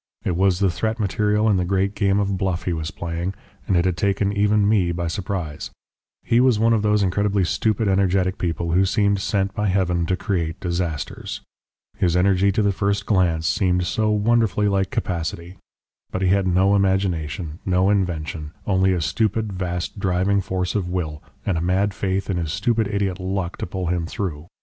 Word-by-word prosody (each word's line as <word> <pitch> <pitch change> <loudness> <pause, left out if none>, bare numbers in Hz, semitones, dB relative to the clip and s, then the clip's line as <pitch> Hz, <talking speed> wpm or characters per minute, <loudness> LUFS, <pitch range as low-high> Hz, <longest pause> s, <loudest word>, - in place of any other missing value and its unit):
It 90 - -1
was 95 0 +3
the 95 -1 +2
threat 110 +5 -2
material 105 +2 +1
in 105 -3 +3
the 90 - +1
great 95 +2 0
game 100 -1 +1
of 100 -1 0
bluff 95 -2 -1
he 90 - -1
was 80 -1 -3
playing, 85 +3 -4 0.3
and 95 -5 +2
it 85 - +2
had 90 -2 0
taken 100 0 +1
even 105 0 +3
me 100 -5 +2
by 85 0 -3
surprise. 85 -3 -4 0.5
He 115 - +2
was 125 -3 +4
one 115 +2 +3
of 110 - +2
those 105 -1 +2
incredibly 100 +1 +1
stupid 110 +4 0
energetic 95 -1 +1
people 85 -1 -2
who 90 +3 +4
seem 100 +1 +2
sent 95 0 -1
by 105 +1 -1
Heaven 90 -3 +1
to 90 - +1
create 85 -6 -2
disasters. 85 -4 -3 0.6
His 90 -2 +1
energy 95 +1 +3
to 105 +3 +1
the 100 - +3
first 100 +1 -1
glance 85 -6 +1
seemed 90 0 +1
so 110 +4 0
wonderfully 105 -1 +2
like 95 -1 +1
capacity! 85 +1 -3 0.5
But 95 - -3
he 95 - +3
had 95 0 +2
no 95 +2 +3
imagination, 90 -5 -1
no 95 +1 +2
invention, 80 -5 -2
only 95 -1 +2
a 90 - -1
stupid, 110 +4 0
vast, 90 +1 -4
driving 95 +1 +1
force 90 -1 -2
of 95 -4 -1
will, 80 -5 -3 0.2
and 90 -5 0
a - - -3
mad 95 +3 +1
faith 95 0 -2
in 95 - -1
his 80 -3 -2
stupid 110 +3 +1
idiot 100 -2 -1
'luck' 95 -1 -3
to - - -4
pull 95 +1 -4
him 85 -1 -1
through. 85 -6 -4
95 Hz, 190 wpm, -22 LUFS, 90-100 Hz, 0.6 s, was